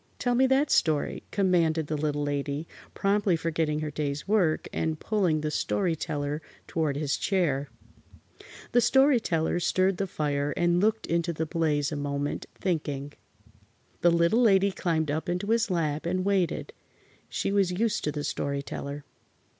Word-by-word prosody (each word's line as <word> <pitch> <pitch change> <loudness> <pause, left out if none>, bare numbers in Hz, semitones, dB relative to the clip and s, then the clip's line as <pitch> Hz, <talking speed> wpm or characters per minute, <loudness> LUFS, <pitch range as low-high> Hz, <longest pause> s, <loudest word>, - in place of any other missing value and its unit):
Tell 245 - 0
me 260 +2 +4
that 270 +3 +2
story," 155 -3 +1
commanded 170 -5 +2
the 155 - -3
Little 145 -1 -1
Lady, 145 +2 -2 0.3
promptly 200 -2 +2
forgetting 160 -2 -1
her 155 -1 -3
day's 145 +1 -3
work 190 -7 +2
and 160 -1 -1
pulling 185 -8 +1
the 155 0 -2
Story 175 +2 0
Teller 150 -1 -3 0.2
toward 155 -4 -1
his 145 -2 0
chair. 150 -8 0 1.0
The 245 - +4
Story 265 +2 +5
Teller 165 -4 0
stirred 185 +2 +1
the 195 - -1
fire 145 -3 -1
and 175 0 +3
looked 220 +2 +1
into 170 0 0
the 160 +1 -2
blaze 155 -2 0
a - - -2
moment, 145 0 -3
thinking. 145 -5 -2 0.9
The 175 - +5
Little 170 +7 +3
Lady 200 -4 +4
climbed 160 -5 -1
up 160 +5 -2
into 180 +4 -1
his 230 -2 +2
lap 155 -3 -1
and 185 +1 -1
waited. 195 -4 0 0.6
She - - -1
was 195 -3 +2
used 220 +4 0
to 150 - 0
the 145 0 -4
Story 140 -1 -2
Teller. 140 +1 -6
165 Hz, 160 wpm, -27 LUFS, 150-195 Hz, 1.0 s, Story